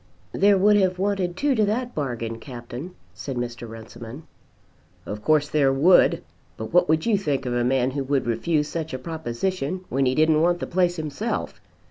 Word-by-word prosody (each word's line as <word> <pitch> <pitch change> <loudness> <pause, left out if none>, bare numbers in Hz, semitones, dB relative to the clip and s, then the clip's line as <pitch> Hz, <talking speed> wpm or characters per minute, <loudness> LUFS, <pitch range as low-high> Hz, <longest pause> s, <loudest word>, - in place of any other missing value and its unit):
"There 200 0 +4
would 205 +2 +5
have 185 -2 +2
wanted 190 -2 -1
two 290 -1 +2
to 220 -4 +2
that 245 +4 -2
bargain, 115 -6 -3
Captain," 125 +7 -8 0.2
said 135 -3 -6
Mr. 120 -1 -5
Runciman. 115 +5 -10 0.8
"Of 105 +1 -6
course 150 +1 +3
there 145 -3 +2
would, 155 +7 +4 0.3
but 110 +5 -7
what 180 0 +4
would 160 0 +2
you 220 -4 +2
think 140 -7 -1
of 125 - -2
a 120 0 +1
man 130 +1 +1
who 140 +1 -2
would 140 -1 0
refuse 150 +6 0
such 160 -1 -4
a - - -2
proposition 160 +4 -3
when 135 +1 +1
he 130 - +1
didn't 155 +1 +3
want 175 +1 +2
the - - -3
place 180 -1 +1
himself? 160 +8 -4
150 Hz, 185 wpm, -24 LUFS, 125-180 Hz, 0.8 s, would